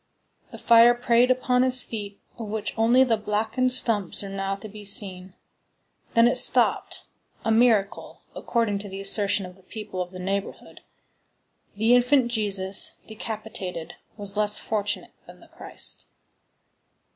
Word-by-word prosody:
The -, -, -11 dB
fire 235 Hz, +1 st, +5 dB
preyed 240 Hz, 0 st, +2 dB
upon 250 Hz, -1 st, +1 dB
his 255 Hz, 0 st, +2 dB
feet, 205 Hz, -3 st, -7 dB, 0.2 s
of 225 Hz, -, -6 dB
which 215 Hz, 0 st, -4 dB
only 235 Hz, +3 st, +4 dB
the 235 Hz, -4 st, +1 dB
blackened 220 Hz, +5 st, -1 dB
stumps 215 Hz, -7 st, 0 dB
are 200 Hz, -, -6 dB
now 195 Hz, 0 st, -3 dB
to 195 Hz, +2 st, -10 dB
be 210 Hz, 0 st, -11 dB
seen; 190 Hz, -2 st, +1 dB, 0.8 s
then 230 Hz, +1 st, +6 dB
it 245 Hz, -, +2 dB
stopped,—a 225 Hz, -, 0 dB
miracle, 220 Hz, -4 st, +1 dB
according 225 Hz, -4 st, -1 dB
to 200 Hz, 0 st, -9 dB
the 195 Hz, +1 st, -8 dB
assertion 200 Hz, 0 st, +1 dB
of 180 Hz, +1 st, -13 dB
the -, -, -21 dB
people 205 Hz, -1 st, -7 dB
of 180 Hz, -, -5 dB
the 185 Hz, -, -11 dB
neighborhood. 195 Hz, +2 st, -5 dB, 0.9 s
The 220 Hz, +4 st, +2 dB
infant 245 Hz, 0 st, +3 dB
Jesus, 200 Hz, -4 st, +1 dB
decapitated, 215 Hz, -6 st, -6 dB, 0.2 s
was 200 Hz, -1 st, -1 dB
less 210 Hz, 0 st, +1 dB
fortunate 205 Hz, -1 st, -3 dB
than -, -, -14 dB
the -, -, -19 dB
Christ. -, -, -4 dB
210 Hz, 145 wpm, -24 LUFS, 195-235 Hz, 0.9 s, then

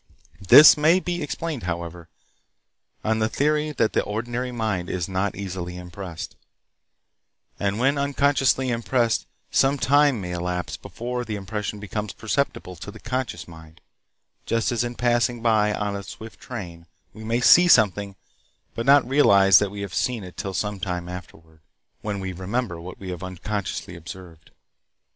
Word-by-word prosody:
This 150 Hz, -, +10 dB
may 160 Hz, +5 st, +4 dB
be 175 Hz, -1 st, -3 dB
explained, 150 Hz, -1 st, -4 dB
however, 85 Hz, -1 st, -5 dB, 0.9 s
on 110 Hz, 0 st, +1 dB
the 110 Hz, 0 st, +1 dB
theory 150 Hz, +3 st, +1 dB
that 115 Hz, -5 st, +1 dB
the -, -, +3 dB
ordinary 120 Hz, +4 st, -3 dB
mind 110 Hz, -7 st, -2 dB
is 90 Hz, -2 st, -2 dB
not 95 Hz, +1 st, -1 dB
easily 90 Hz, -2 st, -5 dB
impressed, 90 Hz, -1 st, -8 dB, 1.2 s
and 100 Hz, 0 st, -1 dB
when 135 Hz, +4 st, +2 dB
unconsciously 140 Hz, -2 st, +2 dB
impressed 115 Hz, 0 st, 0 dB, 0.2 s
some 135 Hz, +1 st, +3 dB
time 145 Hz, -2 st, +3 dB
may 90 Hz, -2 st, -5 dB
elapse 90 Hz, 0 st, -3 dB
before 125 Hz, +1 st, -5 dB
the 110 Hz, -3 st, -4 dB
impression 105 Hz, +1 st, -4 dB
becomes 105 Hz, 0 st, -4 dB
perceptible 110 Hz, -6 st, -2 dB
to -, -, -8 dB
the -, -, -11 dB
conscious 125 Hz, -10 st, -4 dB
mind, 80 Hz, -1 st, -14 dB, 0.7 s
just 115 Hz, +1 st, +1 dB
as 120 Hz, -1 st, 0 dB
in 120 Hz, 0 st, -4 dB
passing 120 Hz, -1 st, +1 dB
by 110 Hz, -2 st, +3 dB
on 105 Hz, -1 st, -2 dB
a 100 Hz, -, -4 dB
swift 110 Hz, +3 st, -11 dB
train, 85 Hz, -8 st, -8 dB, 0.3 s
we 110 Hz, -, -11 dB
may 115 Hz, +2 st, 0 dB
see 175 Hz, +8 st, +7 dB
something, 100 Hz, -, +3 dB, 0.6 s
but 115 Hz, +2 st, -4 dB
not 140 Hz, 0 st, +6 dB
realize 100 Hz, -9 st, +6 dB
that 105 Hz, -, 0 dB
we 100 Hz, +1 st, -7 dB
have 100 Hz, -3 st, -6 dB
seen 120 Hz, -5 st, -1 dB
it 90 Hz, -1 st, -10 dB
till 95 Hz, -1 st, -5 dB
some 105 Hz, +2 st, -2 dB
time 90 Hz, -2 st, -3 dB
afterward, 80 Hz, -3 st, -11 dB, 0.4 s
when 105 Hz, -2 st, -3 dB
we 95 Hz, -1 st, -4 dB
remember 95 Hz, 0 st, -3 dB
what 90 Hz, +1 st, -9 dB
we 95 Hz, -2 st, -6 dB
have 90 Hz, -1 st, -6 dB
unconsciously 95 Hz, 0 st, -4 dB
observed. 85 Hz, -1 st, -11 dB
105 Hz, 155 wpm, -24 LUFS, 90-125 Hz, 1.2 s, This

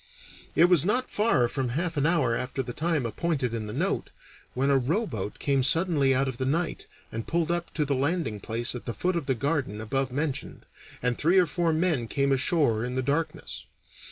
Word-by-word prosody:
It 165 Hz, -, +7 dB
was 175 Hz, -5 st, +5 dB
not 245 Hz, +7 st, 0 dB
far 210 Hz, -, +3 dB
from 130 Hz, 0 st, -2 dB
half 165 Hz, +6 st, -2 dB
an 145 Hz, +1 st, +2 dB
hour 145 Hz, -9 st, +2 dB
after 125 Hz, +2 st, -3 dB
the 120 Hz, -1 st, -6 dB
time 160 Hz, -3 st, 0 dB
appointed 130 Hz, +1 st, -1 dB
in 110 Hz, -2 st, -3 dB
the -, -, -5 dB
note, 170 Hz, -, -1 dB, 0.5 s
when 135 Hz, +2 st, +2 dB
a 135 Hz, -, +5 dB
rowboat 130 Hz, -, -2 dB
came 140 Hz, -2 st, +1 dB
suddenly 150 Hz, -1 st, +3 dB
out 135 Hz, +1 st, +2 dB
of 130 Hz, -1 st, -4 dB
the 130 Hz, -, 0 dB
night 165 Hz, +4 st, -1 dB, 0.2 s
and 115 Hz, 0 st, -5 dB
pulled 170 Hz, 0 st, 0 dB
up 175 Hz, 0 st, -2 dB
to 150 Hz, -, +1 dB
the 140 Hz, -, 0 dB
landing 140 Hz, -, -1 dB
place 115 Hz, +4 st, 0 dB
at 125 Hz, -, -7 dB
the 115 Hz, -, -4 dB
foot 180 Hz, 0 st, 0 dB
of 165 Hz, -5 st, -2 dB
the 130 Hz, -, +2 dB
garden 135 Hz, -4 st, -1 dB
above 130 Hz, +4 st, -1 dB
mentioned, 140 Hz, +1 st, -3 dB, 0.4 s
and 125 Hz, -1 st, 0 dB
three 170 Hz, +5 st, +3 dB
or 185 Hz, -, +6 dB
four 170 Hz, +1 st, 0 dB
men 155 Hz, -7 st, +1 dB
came 140 Hz, +3 st, 0 dB
ashore 135 Hz, -4 st, +2 dB
in 125 Hz, +1 st, -3 dB
the 130 Hz, -, 0 dB
darkness. 155 Hz, +4 st, -2 dB
140 Hz, 210 wpm, -27 LUFS, 125-165 Hz, 0.5 s, It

